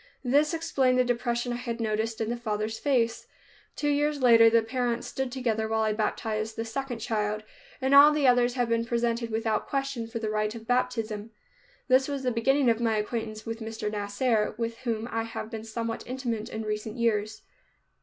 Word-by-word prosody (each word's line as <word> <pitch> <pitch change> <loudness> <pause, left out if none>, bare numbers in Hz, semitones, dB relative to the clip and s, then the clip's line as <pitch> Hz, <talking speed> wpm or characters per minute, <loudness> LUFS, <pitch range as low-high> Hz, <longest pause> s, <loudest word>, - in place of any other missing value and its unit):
This 290 +5 +3
explained 270 -6 +1
the 255 - +5
depression 240 0 -1
I - - -3
had 235 -1 -4
noticed 220 0 -1
in 225 0 -1
the - - -1
father's 220 -1 -3
face. 240 -5 0 0.5
Two 295 - -1
years 290 0 +1
later 230 -3 +7
the 230 0 +4
parents 240 0 -1
stood 265 -1 -3
together 230 -4 -1
while 220 0 +1
I 215 -1 +1
baptized 215 0 -2
the 225 - -3
second 250 +2 -4
child, 215 -2 -2 0.4
and 265 0 +1
all 285 +2 +9
the 300 -2 +1
others 245 -1 +4
have 245 -2 +1
been 230 0 +1
presented 235 0 -1
without 220 -1 -1
question 275 -4 -2
for 230 - -5
the 220 -1 -2
rite 215 +1 -1
of 225 -1 -9
baptism. 225 -3 -1 0.6
This 260 +1 +4
was 280 -2 -3
the 250 - +1
beginning 270 +4 +2
of 230 -1 +3
my 225 -2 +2
acquaintance 215 0 -3
with 225 0 -4
Mr. 220 -1 -4
Nasser, 210 +2 0
with 230 0 -3
whom 230 -3 -2
I 225 - 0
have 225 0 -6
been 220 -2 -5
somewhat 230 +1 -4
intimate 245 -4 -3
in 220 - -4
recent 215 +2 -4
years. 215 -2 0
230 Hz, 195 wpm, -27 LUFS, 220-250 Hz, 0.6 s, all